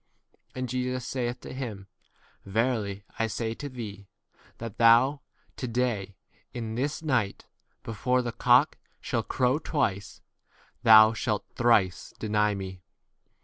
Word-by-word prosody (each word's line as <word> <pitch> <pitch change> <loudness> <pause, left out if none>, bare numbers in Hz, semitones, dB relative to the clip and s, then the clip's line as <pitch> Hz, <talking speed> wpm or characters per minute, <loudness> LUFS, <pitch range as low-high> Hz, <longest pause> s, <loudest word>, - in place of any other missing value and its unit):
And 130 0 -3
Jesus 125 0 -2
saith 125 -1 -3
to - - -8
him, 115 -7 -6 0.6
Verily 105 -1 -1 0.2
I 115 - +2
say 110 +1 -3
to 145 +4 -7
thee, 105 -6 -8 0.5
that 115 -3 -8
thou 115 +4 +6
x 145 - -17 0.4
to 125 - -3
day, 115 -5 -1 0.4
in 115 -2 -4
this 145 +7 -2
night, 125 -10 0 0.4
before 125 +3 0
the 120 - -3
cock 125 +5 +3 0.2
shall 115 - -1
crow 130 +5 +1
twice, 110 -11 -2 0.6
thou 110 -1 +9
31 - - -4
shalt 105 -3 -1
thrice 110 -6 +2
deny 105 -1 +1
me. 95 -2 -7
115 Hz, 135 wpm, -27 LUFS, 105-125 Hz, 0.6 s, thou